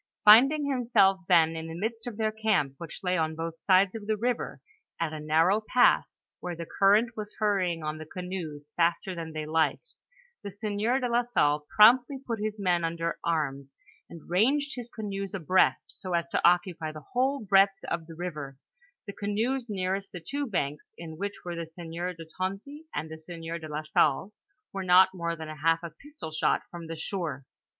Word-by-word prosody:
Finding 270 +8 +7
himself 235 -8 +3
then 165 -3 +4
in 160 0 -5
the 165 0 -7
midst 225 +3 -3
of 225 -4 -6
their 220 -1 0
camp, 215 -11 +1
which 170 +3 -8
lay 180 -1 +1
on 160 0 -1
both 165 0 -5
sides 185 0 +4
of 215 -2 -7
the 215 -1 +1
river, 240 +2 -2 0.4
at 165 -2 -1
a 155 - -5
narrow 165 +7 +3
pass, 250 -1 +3 0.2
where 175 -1 -5
the 170 0 -6
current 210 +7 +3
was 210 -1 -7
hurrying 185 -6 0
on 155 0 -4
the 155 - -8
canoes 160 -5 -6
faster 175 +3 +1
than 165 -2 -6
they 155 -1 -4
liked, 160 - 0 0.5
the 200 - -5
sieur 210 +5 -1
de 250 - -1
la 240 0 +2
Salle 150 -11 +1
promptly 245 +6 +6
put 240 -4 -5
his 215 0 -3
men 175 -3 +1
under 165 0 -2
arms, 140 -4 -2 0.3
and 165 - -12
ranged 275 - +2
his 245 -2 -6
canoes 200 -4 -5
abreast 175 -6 +2 0.2
so 185 -2 -2
as 170 0 0
to - - 0
occupy 175 -2 +2
the 155 -1 -11
whole 265 +3 +1
breadth 195 -2 +4
of 170 -1 -3
the 165 - -10
river, 150 -6 -6 0.5
the 200 - -7
canoes 230 +6 -2
nearest 195 0 -2
the 180 - -7
two 285 0 -2
banks, 150 - -3
in 165 -2 -8
which 200 +4 -4
were 175 - -4
the 170 -1 -5
sieur 170 +1 -5
de 165 -1 -10
Tonty, 205 +12 -4
and 155 +1 -4
the 160 - -8
sieur 165 0 -6
de 160 - -8
la 150 +1 -4
Salle, 155 +5 +1 0.4
were 195 -1 -3
not 185 +1 +6
more 170 -2 -3
than 160 -1 -8
half 165 +2 +2
a 170 - -6
pistol 290 - -10
shot 155 - +1
from 170 -1 -8
the 165 - -5
shore. 160 -5 -4
180 Hz, 190 wpm, -28 LUFS, 165-215 Hz, 0.5 s, Finding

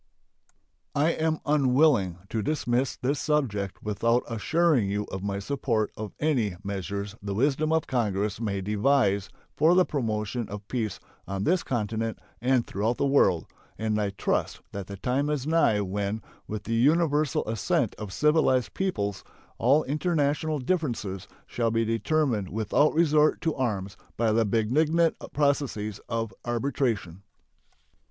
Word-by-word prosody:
I 150 +3 +3
am 160 -1 -1
unwilling 130 - +3
to 110 - -1
dismiss 130 -1 0
this 135 +3 -1
subject 110 -11 -1
without 115 +3 +1
assuring 130 0 +2
you 105 +1 -1
of 95 - -4
my 100 0 -2
support 115 -1 -1
of 105 -1 -7
any 125 - +1
measures 100 +1 -4
the 100 -1 -4
wisdom 145 +6 +1
of 160 -1 +2
Congress 105 -3 -1
may 100 -3 -1
devise 105 -1 +2 0.3
for 160 +4 +4
the 185 0 +5
promotion 110 -3 -2
of 105 0 -7
peace 115 -5 -2 0.3
on 95 0 -3
this 180 - +2
continent 115 -2 -2 0.2
and 125 -1 +2
throughout 110 +4 -1
the - - +1
world, 100 - +3 0.3
and 110 -1 0
I 100 - 0
trust 95 - -1
that 100 -2 -6
the 100 - -7
time 130 +7 0
is 145 -3 -1
nigh 155 -10 +3
when, 100 +2 -2 0.2
with 105 -1 -5
the 115 - -3
universal 150 +3 +2
assent 110 -1 0
of 105 -3 -6
civilized 150 - +2
peoples, 100 - -2 0.4
all 140 +6 +4
international 150 0 0
differences 120 - -2 0.2
shall 115 -1 -1
be 115 0 +1
determined 115 - 0
without 110 +9 +2
resort 155 -2 +4
to 160 - 0
arms 100 -7 -2 0.2
by 115 -1 +2
the 110 +1 +3
benignant 150 +10 +2 0.2
processes 140 -8 0
of 115 -1 -2
arbitration. 120 - -1
115 Hz, 140 wpm, -27 LUFS, 105-145 Hz, 0.4 s, the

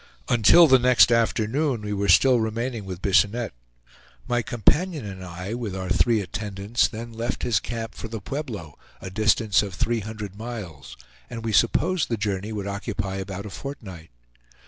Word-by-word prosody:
Until 120 +9 +7
the 130 -4 +6
next 125 -1 +5
afternoon 115 +3 +1
we 105 0 -3
were 100 0 -1
still 125 +7 +5
remaining 115 0 -3
with 95 -1 -7
Bisonette. 105 - +2 0.7
My 120 0 +1
companion 145 - +1
and 95 -2 -7
I 90 +3 -6
with 115 -5 -4
our 95 -1 -4
three 110 +2 +3
attendants 100 +4 -1
then 115 +1 -8
left 115 +2 -3
his 120 -3 +2
camp 115 -2 -5
for - - -7
the 110 0 -6
Pueblo, 105 - -6 0.2
a 95 - -8
distance 110 0 +3
of 100 -4 -6
three 120 +5 0
hundred 105 -2 -7
miles, 105 - -8 0.3
and 115 -1 -7
we 110 - -1
supposed 155 - +2
the 115 - -1
journey 100 0 -2
would 105 -2 -4
occupy 100 -1 -3
about 95 +1 -6
a 105 - -7
fortnight. 95 - -8
110 Hz, 170 wpm, -24 LUFS, 100-120 Hz, 0.7 s, Until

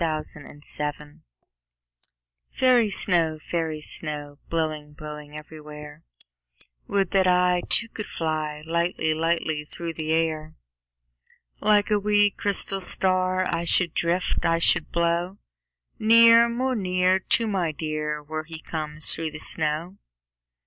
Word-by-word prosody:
Snow 155 -2 -1 0.4
Song 150 0 -3 1.3
FAIRY 250 -4 +2
snow, 170 -5 +2
fairy 160 0 -4
snow, 145 -2 -1
Blowing, 155 -2 -3
blowing 150 0 -10
everywhere, 150 0 -11 0.9
Would 195 -2 -1
that 190 -1 +2
I 180 0 +2
Too, 230 - +3
could 215 -1 -8
fly 155 -2 -4
Lightly, 170 -1 -1
lightly 160 -1 -2
through 165 +2 -7
the 155 0 -4
air. 160 -1 -1 1.0
Like 210 0 +2
a 210 - +3
wee, 205 0 +2
crystal 195 -1 +1
star 185 0 +3
I 170 - -2
should 170 -1 +1
drift, 175 +2 0
I 165 0 +2
should 165 0 +1
blow 170 +3 -1 0.6
Near, 230 +1 +6
more 255 +3 -2
near, 185 -2 +1
To 230 +4 -1
my 190 -6 -1
dear 150 0 -4
Where 155 +1 -6
he 160 0 -9
comes 155 -1 0
through 160 0 -4
the 155 - -9
snow. 160 +5 +1
165 Hz, 125 wpm, -24 LUFS, 155-185 Hz, 1.3 s, Near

